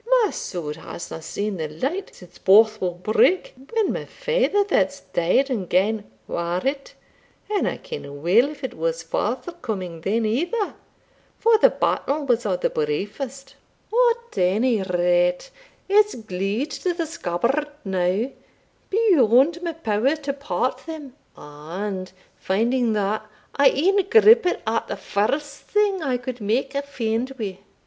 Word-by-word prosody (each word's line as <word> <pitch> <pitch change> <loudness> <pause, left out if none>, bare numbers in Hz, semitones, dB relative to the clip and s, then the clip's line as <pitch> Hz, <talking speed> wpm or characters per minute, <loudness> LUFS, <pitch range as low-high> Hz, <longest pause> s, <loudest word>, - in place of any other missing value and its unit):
My 420 - +1
sword 155 -4 -5
hasna 165 0 -8
seen 200 +4 -3
the 160 -2 -2
light 270 - -3
since 175 -1 -15
Bothwell 205 -2 +4
Brigg, 215 - +2 0.2
when 445 -3 +1
my - - -4
father 475 -4 +1
that's 285 -7 0
dead 220 +11 +1
and 200 -8 -2
gane, 205 +3 +1 0.2
ware 170 +1 -2
it; 275 +1 -2 0.6
and 415 - +1
I - - -2
kenna 470 - -8
weel 175 - +3
if 295 -1 -11
it 260 - -3
was 165 0 -2
forthcoming 215 - -3
then 220 +6 0
either, 350 - -1 0.6
for 455 0 +4
the - - +7
battle 290 +1 -1
was 240 -4 +1
o' 190 - +1
the - - -1
briefest 235 - -3 0.4
At 475 - +2
ony 210 +5 +2
rate, 180 - +1 0.4
it's 420 +1 +4
glued 215 +5 -3
to 355 +4 -2
the 335 -1 -1
scabbard 285 - -1 0.2
now 190 +6 0 0.6
beyond 330 - +4
my 340 -2 -3
power 255 -1 +1
to 285 -2 -4
part 275 -2 -2
them; 305 -5 -7 0.2
and, 185 +6 -6 0.3
finding 230 +4 +1
that, 215 +1 -1 0.3
I 280 - +6
e'en 375 +8 +2
grippit 445 -3 +6
at 225 +1 -1
the - - -4
first 260 +9 -1
thing 410 -3 +1
I 265 -5 0
could 245 -1 -6
make 240 +7 0
a 280 - 0
fend 250 -2 -2
wi'. 195 -5 -5
235 Hz, 140 wpm, -23 LUFS, 190-300 Hz, 0.6 s, the